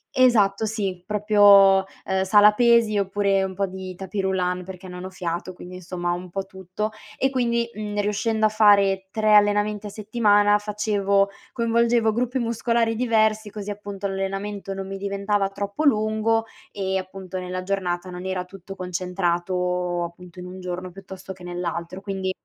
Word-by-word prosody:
esatto 220 -5 +4
sì, 195 -5 -3
proprio, 205 -2 +6 0.3
uhm, 190 0 0
sala 210 +2 +6
pesi, 235 -2 +4
oppure 195 0 +1
un 190 -1 -4
po' 195 +1 0
di 185 0 -7
tapis 195 +2 -4
roulant 180 -1 -1
perché 185 0 -10
non 180 0 -8
ho 185 - -6
fiato, 175 -1 -4
quindi 180 0 -11
insomma 175 -1 -4
un 180 +1 -6
po' 195 +2 -4
tutto. 190 +3 -5 0.3
E 265 - +2
quindi, 235 -3 0
mhmm, 210 -1 -4
riuscendo 215 +2 0
a 215 - +4
fare 200 -3 +4
3 215 -1 +3
allenamenti 205 0 +3
a - - -6
settimana 205 -1 +3
facevo 205 -1 +1 0.2
coinvolgevo 235 -1 +2
gruppi 250 +3 -1
muscolari 230 -1 0
diversi 220 -2 +1
così, 205 0 -7
appunto, 205 -1 -5
l'allenamento 195 +1 -4
non 195 0 -5
mi 195 - -5
diventava 200 0 -1
troppo 200 +8 -4
lungo 220 -2 +2 0.3
e, 190 -1 -2
appunto, 185 0 -6
nella 185 0 -4
giornata 185 -2 -2
non 180 0 -7
era 185 -1 -2
tutto 195 +1 -11
concentrato, 180 -1 -1
appunto, 175 +1 -11
in 180 - -7
un 185 +1 -9
giorno 180 0 -5
piuttosto 190 0 -9
che 180 -1 -15
nell'altro, 175 0 -4
quindi 195 -1 -3
195 Hz, 160 wpm, -23 LUFS, 185-210 Hz, 0.3 s, proprio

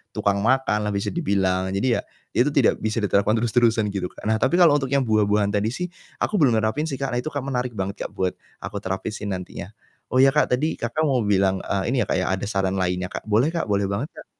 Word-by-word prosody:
tukang 100 0 +1
makan 110 -2 +1
lah - - -1
bisa 100 - -1
dibilang. 95 - 0
Jadi 120 +4 +1
ya, - - -3 0.3
itu 125 +4 +2
tidak 140 -5 +2
bisa 110 0 -2
diterapkan 100 +2 +2
terus-terusan 115 -2 +2
gitu, 95 -2 -2
Kak. - - -15
Nah 110 0 +1
tapi 175 - +2
kalau 175 -4 +6
untuk 135 - -3
yang 140 0 +1
buah-buahan 105 -2 +2
tadi 105 +1 0
sih 180 +9 -4 0.2
aku 210 - -1
belum 130 -7 +4
nerapin 110 +9 0
sih, 140 - -3
Kak. 135 +1 -3
Nah 120 - 0
itu 125 - -5
kan 145 -3 -3
menarik 125 -3 -2
banget, 95 0 -3
Kak, - - -24
buat 95 -1 0 0.3
aku 100 - -4
terapin 95 +2 -3
si 105 -1 -6
nantinya. 90 -2 -5 0.4
Oh 130 - 0
ya, 135 - +6
Kak, 150 -4 +2
tadi, 155 +5 -2
Kakak, 120 +7 -1
mau 135 -4 +2
bilang, 95 -2 +2
eee, 100 +4 -2
ini 135 - 0
ya, - - +1
Kak, - - 0
ya 90 - 0
ada 95 - -2
saran 95 -2 -1
lainnya, 90 0 -1
Kak, - - -7
boleh, 115 +9 +3
Kak, 170 -7 -2
boleh 100 -1 +1
banget, 100 +9 -2
Kak. - - -11
110 Hz, 245 wpm, -23 LUFS, 100-130 Hz, 0.4 s, kalau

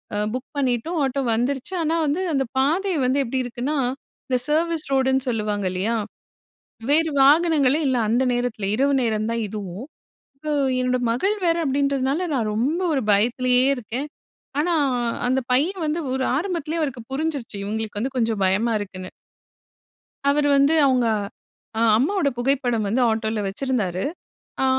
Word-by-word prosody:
அ - - -1 0.2
book 255 +1 -4
பண்ணிட்டோம், 265 +5 0
auto 275 0 0
வந்துருச்சி. 265 +8 -1
ஆனா 320 +2 +1
வந்து, 300 +6 0
அந்த 270 -1 +1
பாதை 355 +8 +1
வந்து 265 +3 +2
எப்பிடி 255 +1 -2
இருக்குன்னா, 250 +5 -3 0.5
இந்த 255 - +2
சர்வீஸ் 325 +1 0
ரோடுன்னு 265 0 +2
சொல்லுவாங்க 210 -3 -1
இல்லயா, 200 +6 -1 1.0
வேறு 320 +1 +3
வாகனங்களே 300 -1 +4
இல்ல. 255 -1 +1
அந்த 245 +3 +2
நேரத்தில 240 -5 -2
இரவு 275 +4 +2
நேரம் 220 -2 0
தான் 230 -1 -1
இதுவும். 200 +2 -6 0.5
இப்ப 305 +2 -8 0.3
என்னோட 255 0 +1
மகள் 390 - 0
வேற 335 0 +3
அப்பிடின்றதுனால, 275 +3 0
நான் 225 -4 0
ரொம்ப 285 +11 0
1 265 - 0
பயத்திலே 245 +4 +2 0.2
இருக்கேன். 250 +5 -5 0.5
ஆனா, 345 +2 +1 0.5
அந்த 260 +1 +2
பையன் 340 +9 +1
வந்து 310 +3 -1
ஒரு 265 0 -1
ஆரம்பத்திலே 335 -2 -2
அவருக்கு 265 -6 -3
புரிஞ்சிருச்சி. 280 -7 -3
இவுங்களுக்கு 215 0 -3
வந்து 265 +4 -3
கொஞ்சம் 225 -3 0
பயமா 215 +5 +1
இருக்க்குன்னு. 185 -2 -7 1.2
அவரு 290 +1 +3
வந்து, 280 +4 +4
அவுங்க 250 -3 +2 0.7
அ - - +1 0.2
அம்மாவோட 325 - +1
புகைப்படம் 245 -4 0
வந்து 230 +6 +1
ஆட்டோல 220 0 -1
வச்சிருந்தாரு. 195 -4 -2 0.6
அ - - +3
260 Hz, 145 wpm, -23 LUFS, 230-295 Hz, 1.2 s, வாகனங்களே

